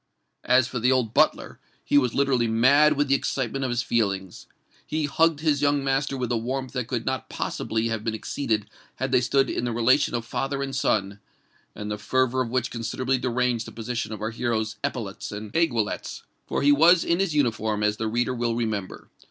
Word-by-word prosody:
As 125 -1 +4
for 125 - -4
the 125 +3 +3
old 125 -4 +1
butler, - - +1 0.3
he - - 0
was 125 -5 +3
literally 135 -4 +2
mad 140 +7 +5
with 145 0 0
the 135 - +2
excitement 135 -1 -1
of 130 - -1
his 120 0 0
feelings. 95 -5 -2 0.4
He 155 -1 -2
hugged 160 +1 +2
his 150 -3 +1
young 145 -1 +2
master 135 0 0
with 125 -1 -2
a 120 - +1
warmth 130 +3 -4
that 125 -3 -3
could 120 -3 -3
not 130 -3 -3
possibly 115 +1 -2
have 115 -1 -3
been 110 -1 -2
exceeded 110 -2 -2 0.3
had 130 0 -3
they 125 - +4
stood 135 +2 +2
in - - -2
the 120 - -1
relation 120 +4 +2
of 115 -1 -3
father 135 +4 -2
and 135 -1 -4
son, 100 -5 0 0.6
and 105 0 -5
the 105 - -4
fervour 130 +4 +1
of 120 - -2
which 130 0 -1
considerably 125 +3 -1
deranged 125 -2 0
the - - -8
position 115 0 -4
of 110 - -6
our 110 - -2
hero's 115 -2 -2
epaulettes 105 -5 -4
and 105 0 -7
aiguillettes—for 120 -5 -2
he 145 - +6
was 165 +4 +6
in 170 +1 +1
his 195 -6 0
uniform, 110 -6 0
as 105 0 +1
the 110 - -2
reader 120 +3 0
will 120 -1 -1
remember. 110 -5 -3
125 Hz, 200 wpm, -25 LUFS, 110-135 Hz, 0.6 s, he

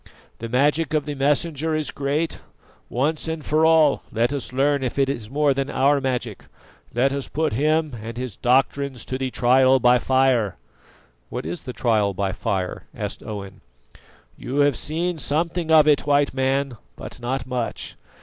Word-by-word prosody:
The 115 - -5
magic 145 +5 +1
of 150 -2 0
the 150 - -3
Messenger 150 +3 0
is 155 -1 -2
great; 145 +4 -2 0.5
once 150 +6 -1
and 160 -2 -4
for 155 +1 +3
all 160 -3 +4
let 120 +4 +1
us 140 -3 -4
learn 140 +2 +1
if 130 0 -3
it 135 -1 +2
is 110 -5 -6
more 145 +1 +2
than 135 +1 -2
our 140 +1 +2
magic. 125 -5 -3 0.5
Let 135 +3 +1
us 140 -1 -3
put 155 -3 -1
him 155 +2 +1
and 115 +1 -7
his 125 -5 -5
doctrines 135 +1 +1
to 130 - -4
the 130 -1 -1
trial 130 +1 +4
by 125 0 +5
fire." 130 -6 +2 0.7
"What - - -5
is 85 +2 -4
the 130 - -6
trial 110 -4 +1
by 95 0 -1
fire?" 95 -3 -3
asked - - -5
Owen. 100 -2 -8 0.7
"You 140 +3 -2
have 145 -2 +3
seen 165 +6 -2
something 165 +3 -1
of 155 -2 +6
it, 150 -1 +3
White 145 -1 +3
Man, 135 -1 0 0.2
but - - -8
not 125 +1 -2
much. 125 -2 -4
135 Hz, 170 wpm, -23 LUFS, 125-150 Hz, 0.7 s, of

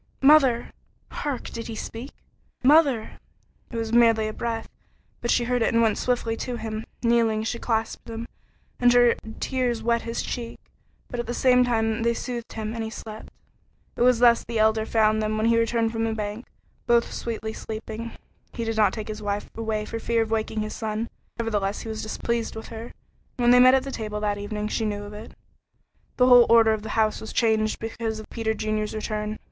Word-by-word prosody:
"Mother!" 270 -5 +5 0.4
Hark! 285 -4 -4
Did 230 -1 -6
he 225 - -5
speak? 230 +4 -6 0.5
"Mother!" 275 -5 +4 0.5
It 235 - -6
was 225 0 -3
merely 230 -2 +5
a 215 - -4
breath, 230 0 -3 0.5
but 235 - -3
she 240 - +3
heard 245 0 0
and 230 0 +2
went 220 -2 +2
swiftly 240 -2 0
to 250 +1 -4
him. 220 -1 -5 0.2
Kneeling, 230 -2 +2
she 235 +1 -3
clasped 225 0 -2
him, 230 +1 -5 0.5
and 245 0 +5
her 245 -1 +6 0.3
tears 245 -3 -1
wet 235 0 +2
his 230 0 -3
cheek, 235 -1 -5 0.5
but 245 - -5
at 240 - -3
the 240 - -3
same 250 -1 +4
time 225 -2 0
they 235 0 +1
soothed 240 -2 -5
him, 220 0 -4
and 230 -1 -3
he 220 - -4
slept. 220 -1 -9 0.7
It - - -5
was 250 0 +5
thus 235 0 +5
the 230 -1 -4
Elder 220 0 +2
found 215 -1 +3
them 215 0 -1
when 215 - 0
he 230 0 +4
returned 230 0 +1
from 225 0 -1
the 225 -1 -1
bank, 210 +2 -5 0.4
both 235 -1 +3
sweetly 220 -1 -4
sleeping. 220 +1 -6 0.4
He 230 - -3
did 225 -1 -2
not 210 -3 +4
take 215 -2 -5
his 215 0 -6
wife 205 0 -3
away 220 -1 -2
for 230 - -5
fear 230 0 +1
of 220 - -8
waking 220 -1 -1
his 215 0 -4
son, 220 +1 -3 0.3
nevertheless 210 -3 -1
he 225 - -7
was 220 0 -4
displeased 230 +1 -2
with 220 - -8
her, 225 0 -7
and - - -12 0.4
when 240 -1 +4
they 250 - +7
met 255 +1 +8
at 265 - +2
table 210 -1 -4
that 205 -1 -1
evening, 210 +1 -3
she 225 - -2
knew 205 -1 -2
it. 215 +2 -10 0.8
The 250 - +5
whole 245 -1 +8
order 225 -1 +6
of 215 - -3
the 220 - -7
house 215 -1 +2
was 220 - -7
changed 220 -2 +1
because 225 -1 -4
of 215 - -9
Peter 220 -1 -1
Junior's 215 0 -2
return. 215 0 -3
225 Hz, 200 wpm, -25 LUFS, 215-235 Hz, 0.8 s, met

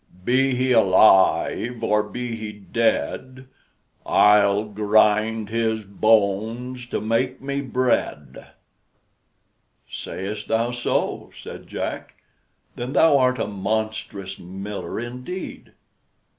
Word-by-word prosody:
Be 130 +1 +2
he 130 +1 0
alive 110 +2 +4
or 105 -1 +3
be 120 +3 -5
he 110 -1 -6
dead, 115 +5 -2 0.6
I'll 105 0 +4
grind 110 +1 +2
his 110 -1 -1
bones 110 +4 0
to - - -2
make 120 +4 -1
me 140 +1 -3
bread!" 120 - -2 1.4
"Say'st 105 +3 -6
thou 115 +2 0
so," 120 0 -2
said - - -10
Jack; - - -5 0.6
"then 125 +3 -5
thou 150 -3 +5
art 125 0 +2
a - - -1
monstrous 100 -1 -4
miller 95 +1 -6
indeed." 125 +10 -7
110 Hz, 100 wpm, -23 LUFS, 105-125 Hz, 1.4 s, thou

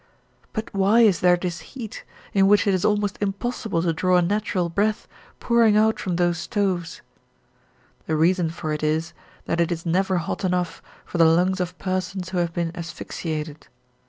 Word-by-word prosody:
But 220 0 -5
why 200 +4 +4
is 205 -7 +4
there 180 -1 +5
this 175 -1 -4
heat, 235 -6 -9 0.3
in 195 -1 +4
which 205 +2 +4
it 200 - +2
is 185 - 0
almost 205 -1 0
impossible 205 -3 -2
to 170 -2 +1
draw 180 +3 +2
a - - +4
natural 200 -1 0
breath, 205 +5 -1 0.3
pouring 230 -3 +4
out 215 0 +3
from 180 -3 -2
those 175 -1 +1
stoves? 185 -4 -2 1.0
The 160 - 0
reason 170 +2 +2
for 160 -1 -4
it 150 - -3
is 155 +2 -1 0.3
that 170 - 0
it 170 - 0
is 170 0 -3
never 185 +2 +1
hot 170 +3 -3
enough 180 -1 -1 0.2
for 175 - -5
the 165 - +7
lungs 180 +4 +3
of 180 0 -3
persons 185 0 -3
who 185 -1 -1
have 170 -1 0
been 170 0 -2
asphyxiated. 160 -3 -6
180 Hz, 180 wpm, -23 LUFS, 170-200 Hz, 1.0 s, the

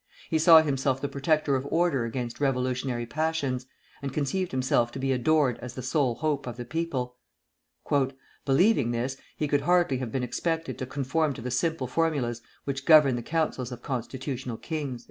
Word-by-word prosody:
He 160 - +3
saw 160 0 +8
himself 135 -2 0
the 140 - -2
protector 140 +1 +1
of 130 +1 -2
order 165 -8 +2
against 120 0 -4
revolutionary 130 -3 0
passions, 140 -3 -1 0.3
and 140 -1 -3
conceived 160 +7 -1
himself 130 -2 +1
to - - -5
be 135 0 0
adored 130 0 +2
as 125 +1 -8
the 130 - -6
sole 130 -2 +1
hope 145 -2 -1
of 120 -1 -5
the 120 - -5
people. 130 -4 -3 1.3
"Believing 145 - +3
this, 125 +3 -2 0.2
he 150 - 0
could 145 0 +2
hardly 175 -3 +3
have 125 -4 -4
been 130 +1 -1
expected 165 +6 -2
to 130 - -3
conform 140 +3 0
to - - -8
the 125 - -3
simple 160 +1 0
formulas 130 -5 0 0.2
which 135 -1 -4
govern 150 -5 +7
the 120 - -3
councils 145 -3 -1
of 125 - -8
constitutional 130 -1 -4
kings." 145 -5 -4
135 Hz, 175 wpm, -27 LUFS, 125-155 Hz, 1.3 s, saw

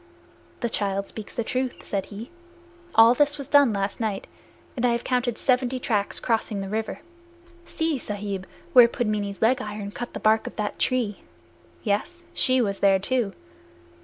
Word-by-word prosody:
"The 235 - +1
child 200 -2 0
speaks 215 0 -9
truth," 255 +1 -2
said 195 -2 -3
he. 215 +6 -9 0.6
"All 225 +1 +8
this 290 +2 +2
was 280 -3 -6
done 285 -4 +5
last 195 -1 -2
night, 215 -4 -2 0.5
and 245 - -3
I 245 -1 +4
have 235 - -2
counted 250 -2 0
seventy 255 0 +1
tracks 210 -5 -1
crossing 225 -3 -1
the 195 - -4
river. 220 +1 -3 0.7
See, 320 -4 -1
Sahib, 200 -3 -4 0.3
where 245 -2 +9
Pudmini's 210 -4 -2
leg 250 +3 +3
iron 210 -3 -5
cut 240 +3 -6
the - - -3
bark 220 +1 +3
of - - -7
that 210 -1 -3
tree! 240 -6 0 0.6
Yes; 245 +12 -2
she 255 -5 +3
was 200 -4 -1
there 195 -1 +5
too." 215 +1 -1
225 Hz, 160 wpm, -25 LUFS, 205-255 Hz, 0.7 s, where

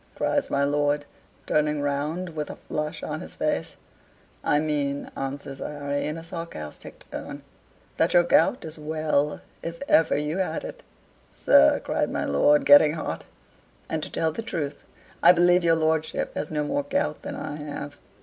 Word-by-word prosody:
cries - - 0
my 140 - +1
lord, 145 0 +1 0.4
turning 150 0 +1
round, 145 +5 -2
with 155 -2 -5
a - - -6
flush 150 0 -4
on - - -4
his - - -9
face. - - -1 0.7
"I 145 - +3
mean," 145 -2 -1
answers 135 0 -5
Harry, 145 -1 -3
in 155 +2 -3
a 165 - -8
sarcastic 165 - -8
tone, - - -7 0.5
"that 165 +2 +2
your 175 - +7
gout 175 +6 +3
is 155 0 -8
well 150 -1 0 0.2
if 165 +5 -6
ever 160 - +4
you 150 +5 -2
had 165 -4 -1
it." - - -8 0.5
"Sir!" 70 - +5
cried - - 0
my - - -2
lord, 145 - +3
getting 145 +1 +8
hot. 160 - -4 0.7
"And 160 - -1
to - - -5
tell 160 -1 0
the 225 - -5
truth 150 -10 -4 0.4
I 175 - +8
believe 175 0 +4
your 165 -1 +4
lordship 160 0 0
has 150 - -3
no 150 -1 -1
more 145 -1 0
gout 140 - -1
than - - -6
I 145 - -5
have. 145 -1 -6
150 Hz, 170 wpm, -25 LUFS, 145-160 Hz, 0.7 s, getting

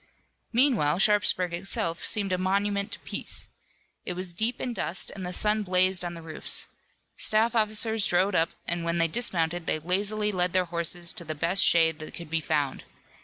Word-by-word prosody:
Meanwhile 235 - +2
Sharpsburg 195 -3 +2
itself 170 -2 -2
seemed 200 -4 +1
a - - +1
monument 200 +2 -1
to - - -2
peace. - - 0 0.5
It 180 - -4
was 180 0 -3
deep 220 +7 0
in 245 - -4
dust 190 -4 0
and 195 - -8
the 180 - -4
sun 210 +3 +1
blazed 185 -1 +2
on 175 -1 -5
the 165 - -10
roofs. 160 -1 +1 0.5
Staff 220 +2 +3
officers 215 -1 +1
rode 185 +3 +1
up, 165 -2 +2 0.2
and 170 0 -2
when 170 0 -2
they 165 0 +2
dismounted 170 -4 -1
they - - +1
lazily 205 +6 -1
led 180 -2 -1
their 185 -1 +2
horses 170 0 0
to 170 - -4
the 155 -1 -6
best 170 +6 +3
shade 160 -2 +4
that 155 - -9
could 170 -3 -10
be 165 -1 0
found. 145 -2 -2
180 Hz, 185 wpm, -26 LUFS, 170-210 Hz, 0.5 s, shade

